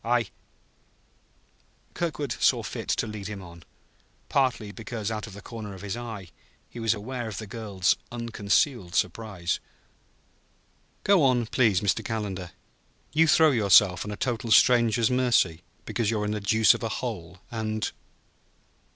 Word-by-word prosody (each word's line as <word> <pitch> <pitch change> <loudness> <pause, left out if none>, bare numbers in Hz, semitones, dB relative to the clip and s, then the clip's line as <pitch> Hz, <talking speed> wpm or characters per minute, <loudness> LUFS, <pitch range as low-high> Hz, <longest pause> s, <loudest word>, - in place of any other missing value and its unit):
I 120 +2 +3
I 110 - -6 0.9
" - - -38
Kirkwood 150 -6 -3
saw - - +3
fit - - -6
to - - +1
lead 105 -3 -6
him 105 -2 -7
on; 85 -1 -12 0.7
partly 120 -6 +1
because, 110 -1 -5
out 110 0 -4
of 105 - -11
the 100 0 -11
corner 110 -4 -7
of 95 - -11
his 100 +1 -3
eye, 110 -6 -7 0.4
he 120 - -8
was 115 -1 +1
aware 120 +3 -5
of 110 - -6
the 110 - -5
girl's 100 -3 0 0.2
unconcealed 115 - 0
suspense. 90 -2 -1 1.4
"Go 200 -3 +5
on, 125 -4 +3
please, 110 -4 +2
Mr. 100 -5 +1
Calendar. 100 -5 -4 0.6
You 165 +2 +4
throw 160 -1 +6
yourself 100 -6 +5
on 105 - -7
a 105 - -5
total 120 -2 -2
stranger's 120 -1 +5
mercy 120 -10 +2 0.2
because 115 -4 -1
you're 105 -2 0
in 105 - -1
the 105 -1 -3
deuce 110 +2 +5
of - - -6
a 115 - -2
hole; 90 -7 -5
and 110 -1 -2
110 Hz, 155 wpm, -26 LUFS, 100-120 Hz, 1.4 s, throw